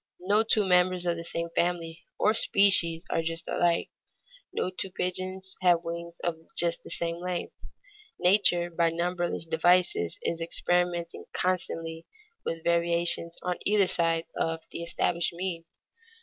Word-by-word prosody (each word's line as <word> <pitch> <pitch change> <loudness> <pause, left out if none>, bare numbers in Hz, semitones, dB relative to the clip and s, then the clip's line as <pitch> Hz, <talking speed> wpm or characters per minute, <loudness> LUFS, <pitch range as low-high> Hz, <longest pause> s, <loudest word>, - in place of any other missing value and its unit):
No 205 +4 +2
two 220 -2 +2
members 180 -1 +2
of 170 -1 +1
the 170 - -6
same 170 0 -3
family 170 -1 -2
or 215 - +3
species 190 -6 +4
are 165 - +1
just 165 0 -3
alike; 170 -1 0 0.6
no 185 - -2
two 190 +1 -3
pigeons 185 +1 -1
have 175 -2 +3
wings 170 0 -6
of 170 -2 -1 0.2
just 170 -1 +3
the - - -12
same 170 0 -1
length. 180 0 -4 0.6
Nature 175 -2 +3
by 170 0 +1
numberless 175 0 -2
devices 165 - +2
is 165 0 -2
experimenting 175 0 -1
constantly 165 -3 -2 0.4
with 165 -1 -4
variations 170 0 +1
on 180 -1 -2
either 205 -1 +3
side 165 -2 +2
of 165 0 -2
the - - -5
established 170 0 0
mean. 170 -1 -4
170 Hz, 140 wpm, -27 LUFS, 170-180 Hz, 0.6 s, species